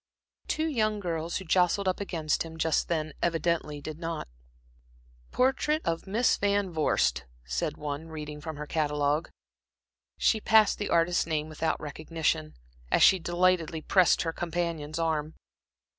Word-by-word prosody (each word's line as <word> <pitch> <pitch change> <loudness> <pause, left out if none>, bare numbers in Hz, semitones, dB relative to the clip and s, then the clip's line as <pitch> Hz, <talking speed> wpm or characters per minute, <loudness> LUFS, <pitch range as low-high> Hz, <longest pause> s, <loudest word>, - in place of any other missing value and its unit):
Two 315 - 0
young 215 -8 0
girls, 170 -3 -2
who 190 - -7
jostled 180 +3 +2
up 185 - 0
against 165 -6 -1
him 160 0 -5
just 160 -1 +1
then 155 -3 -2
evidently 165 -3 0
did 155 +2 -7
not. 165 -2 -4 1.0
"Portrait 270 +4 +1
of 165 +3 -2
Miss 225 +5 +2
Van 200 -2 +1
Vorst," 65 - +1 0.2
said 65 - -2
one, 150 +1 -5
reading 150 -2 -7
from 160 0 -6
her 150 - -5
catalogue, 150 0 0
"by - - -19 0.4
." - - -65
She 220 - +2
passed 215 -2 +4
the 205 - -2
artist's 170 0 +2
name 155 -1 -1
without 160 +1 -1
recognition, 150 - -2 0.3
as - - +4
she 190 - +7
delightedly 175 -2 +1
pressed 185 -3 +4
her 165 -1 -2
companion's 165 -3 -3
arm. 160 -2 -1
165 Hz, 150 wpm, -28 LUFS, 155-185 Hz, 1.0 s, she